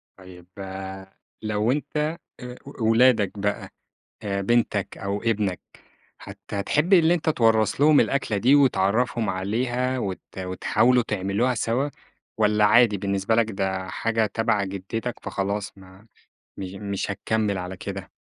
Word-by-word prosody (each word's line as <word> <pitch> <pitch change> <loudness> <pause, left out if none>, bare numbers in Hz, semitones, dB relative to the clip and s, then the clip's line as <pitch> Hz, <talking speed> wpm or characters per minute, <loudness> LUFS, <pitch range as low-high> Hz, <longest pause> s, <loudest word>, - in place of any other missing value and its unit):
طيّب 90 -2 -14 0.9
لو 110 +2 0
أنت 150 +2 -3 0.4
آآ، 125 -1 -8 0.3
ولادك 115 -2 +4
بقى 105 +1 -2 0.6
بنتك 100 +1 0
أو 100 +1 -3
ابنك، 105 -5 0 0.6
هت - - -10
هتحب 150 - 0
اللي 170 -2 +6
أنت 165 -2 -2
توّرث 115 -4 +2
لهم 150 0 +6
الأكلة 140 -6 0
دي، 125 +7 +4
وتعرّفهم 120 -3 +2
عليها 120 +7 -1
وت 95 -6 -3 0.2
وتحاولوا 110 +6 +2
تعملوها 105 +5 0
سوا 120 +5 0 0.5
والَّا 105 -1 +3
عادي 110 0 +5
بالنسبة 100 +2 0
لك 115 -1 +2
ده 95 -2 -2
حاجة 115 +2 0
تبَع 105 -1 0
جدّتك 100 +5 -4
فخلاص 100 +1 -3
ما 95 +2 -16 0.5
مش 95 -1 -6
مش 100 0 -4
هتكمِّل 105 0 -1
على 90 +1 -6
كده؟ 95 -1 -7
105 Hz, 125 wpm, -24 LUFS, 100-120 Hz, 0.9 s, اللي